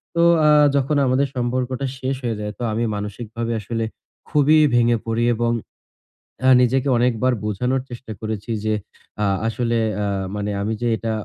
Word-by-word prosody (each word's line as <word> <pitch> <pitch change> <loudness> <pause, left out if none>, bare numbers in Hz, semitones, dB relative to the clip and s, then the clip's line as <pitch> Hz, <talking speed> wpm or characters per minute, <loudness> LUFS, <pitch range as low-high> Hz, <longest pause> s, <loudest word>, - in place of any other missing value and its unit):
তো 170 - +3 0.3
আ - - +6 0.3
যখন 140 +2 +1
আমাদের 130 +2 +2
সম্পর্কটা 125 +2 -1
শেষ 130 +1 -1
হয়ে 115 -3 -1
যায় 105 0 -4
তো - - -4
আমি 115 +2 0
মানসিকভাবে 110 +3 -5
আসলে 115 +2 -3 0.4
খুবই 150 +1 +4 0.2
ভেঙে 120 0 +4
পড়ি 115 +1 0
এবং 120 +1 0 1.1
নিজেকে 130 +2 +2
অনেকবার 125 +1 +2
বোঝানোর 125 +6 0
চেষ্টা 120 -1 -9
করেছি 110 0 -4
যে 110 - +1 0.5
আ - - +3 0.2
আসলে 115 0 0 0.3
আ - - 0 0.3
মানে 105 0 -2
আমি 105 +2 -1
যে, 120 - 0
এটা 115 +1 -3
120 Hz, 155 wpm, -21 LUFS, 110-130 Hz, 1.1 s, আ